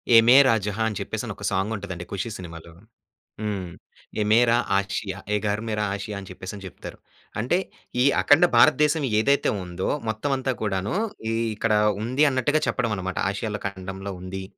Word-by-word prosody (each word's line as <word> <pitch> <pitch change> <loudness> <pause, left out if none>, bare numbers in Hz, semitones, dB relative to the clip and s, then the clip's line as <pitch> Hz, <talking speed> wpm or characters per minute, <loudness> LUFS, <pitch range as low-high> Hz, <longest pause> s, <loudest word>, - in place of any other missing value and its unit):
ఏ - - +11
మేరా 130 -1 +7
జహా! 105 +2 -1
అని 105 - -5
చెప్పేసని 110 +1 -4
ఒక 100 - -12
సాంగ్ 95 +4 0
ఉంటదండి. 90 -4 -6
'ఖుషి' 100 +4 -3
సినిమాలో. 85 -2 -10 0.7
హ్మ్. 100 -5 -3 0.5
ఏ - - +3
మేరా 120 +1 +5 0.2
ఆషియా, 100 0 -3 0.2
ఏ - - +4
ఘర్ 105 +2 -1
మేర 105 -1 -1
ఆషియా 100 +1 -5
అని 95 - -11
చెప్పేసని 95 +2 -8
చెప్తారు. 95 - -10 0.4
అంటే 130 +11 +1 0.4
ఈ - - +3 0.2
అఖండ 150 +5 +6
భారతదేశం 150 +6 +5 0.2
ఏదైతే 140 +5 +3
ఉందో, 90 +1 -4 0.2
మొత్తం 110 +6 -2
అంతా 130 0 -1
కూడాను 95 - -1 0.4
ఈ - - 0 0.2
ఇక్కడ 110 +1 0 0.3
ఉంది 130 +6 +2
అన్నట్టుగా 135 +4 +1
చెప్పడం 120 -4 0
అన్నమాట. 95 0 -4
ఆషియాలో 105 +1 -4
ఖండంలో 95 0 -6
ఉంది. 95 +1 -6
105 Hz, 160 wpm, -24 LUFS, 95-120 Hz, 0.7 s, ఏ